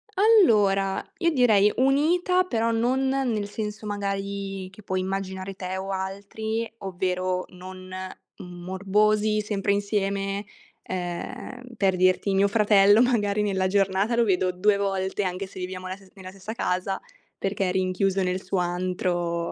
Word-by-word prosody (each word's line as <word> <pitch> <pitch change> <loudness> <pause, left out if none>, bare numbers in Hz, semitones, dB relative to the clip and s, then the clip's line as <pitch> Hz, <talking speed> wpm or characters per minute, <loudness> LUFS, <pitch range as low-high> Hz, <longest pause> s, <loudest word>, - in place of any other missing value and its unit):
Allora, 210 - +4 0.2
io 340 -2 +2
direi 215 -7 +4
unita, 330 +8 +3
però 230 -9 0
non 250 +4 +1
nel 250 -6 0
senso 210 0 -5
magari 200 -1 -3
che 195 +3 -15
puoi 190 -1 -1
immaginare 190 0 -3
te 185 0 -5
o 190 +1 -4
altri, 200 +4 -3
ovvero 185 -1 -2
non 185 0 -10 0.5
morbosi, 200 +4 0
sempre 205 -1 -1
insieme. 200 0 -1 0.4
Ehm, 185 +8 -6
per 195 -2 +2
dirti, 185 +2 +2
mio 195 +1 +4
fratello 205 0 +5
magari 210 -5 +2
nella 190 -2 +1
giornata 195 +3 +1
lo 235 0 +3
vedo 185 -2 +2
2 200 +3 +2
volte, 195 0 -1
anche 185 +1 -3
se 190 - -11
viviamo 185 0 -5
la 185 - -4
ste 195 -1 -19
nella 185 -1 -9
stessa 195 +3 -7
casa 190 -3 -1 0.4
perché 195 -1 -1
è - - 0
rinchiuso 190 +1 +1
nel 185 0 -1
suo 190 +1 -2
antro, 175 -1 -1
195 Hz, 140 wpm, -25 LUFS, 185-215 Hz, 0.5 s, fratello